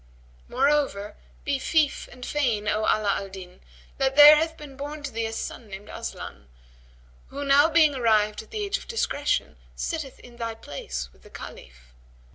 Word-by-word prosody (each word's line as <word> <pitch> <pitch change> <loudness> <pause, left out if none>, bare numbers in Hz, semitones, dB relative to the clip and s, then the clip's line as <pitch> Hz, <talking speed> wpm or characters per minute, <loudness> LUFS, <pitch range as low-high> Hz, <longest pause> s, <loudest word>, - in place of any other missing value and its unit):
Moreover, 270 -6 +1 0.3
be 280 -2 0
fief 305 +1 +1
and 250 0 -9
fain, 235 -8 0
O 210 - +1
Ala 210 -2 +2
al 195 - -7
Din, 185 -1 -11 0.4
that 270 0 +1
there 295 +1 +11
hath 320 +1 0
been 290 -3 -11
born 290 +2 -6
to 285 - -4
thee 225 0 -2
a - - -5
son 225 0 -6
named 195 0 -9
Aslan; 65 0 -7 0.8
who 285 +1 -6
now 285 +3 +6
being 315 -2 +5
arrived 215 -4 +2
at - - -17
age 410 -1 -1
of - - -13
discretion, 470 +2 -1 0.2
sitteth 310 -5 -4
in 240 -1 -15
thy 230 -1 -4
place 65 - -6
with - - -24
the - - -16
Caliph. - - -12
255 Hz, 170 wpm, -26 LUFS, 210-295 Hz, 0.8 s, there